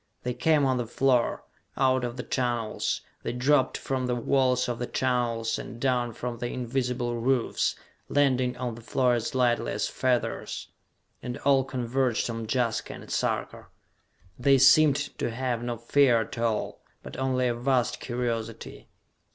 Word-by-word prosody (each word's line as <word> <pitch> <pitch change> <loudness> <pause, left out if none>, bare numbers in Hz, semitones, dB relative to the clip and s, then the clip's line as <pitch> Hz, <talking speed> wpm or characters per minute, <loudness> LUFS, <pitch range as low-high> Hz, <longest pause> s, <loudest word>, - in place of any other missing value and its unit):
They 125 - -1
came 145 +3 +3
on 130 -1 +2
the 120 -2 -2
floor, 125 0 +1 0.3
out 130 -1 +3
of 120 0 -4
the 125 - -4
tunnels; 120 -3 -1 0.2
they - - -3
dropped 130 +2 +2
from 130 -2 -2
the 125 - 0
walls 125 +1 +2
of 120 -1 -3
the 120 - -3
tunnels, 120 -3 0
and 120 - -8
down 125 -2 0
from 120 0 -5
the 120 - -2
invisible 125 -1 -2
roofs, 125 0 +1 0.3
landing 130 -3 +2
on 125 -2 -3
the 115 - -10
floor 125 +2 +1
as 120 +1 -2
lightly 120 -2 +1
as - - -1
feathers 125 -2 -1 0.5
and 125 -1 -5
all 135 -1 +5
converged 130 -1 -1
on 115 -1 -5
Jaska 120 -2 -1
and - - -11
Sarka. - - -2 0.7
They 135 +2 +5
seemed 140 +2 +6 0.2
to - - 0
have 120 0 -2
no 120 -1 -3
fear 120 0 +3
at 110 - -6
all, 115 -2 -1 0.2
but - - -9
only 130 -1 +1
a 120 - +1
vast 125 +1 0
curiosity. 115 -2 -4
125 Hz, 160 wpm, -27 LUFS, 120-130 Hz, 0.7 s, seemed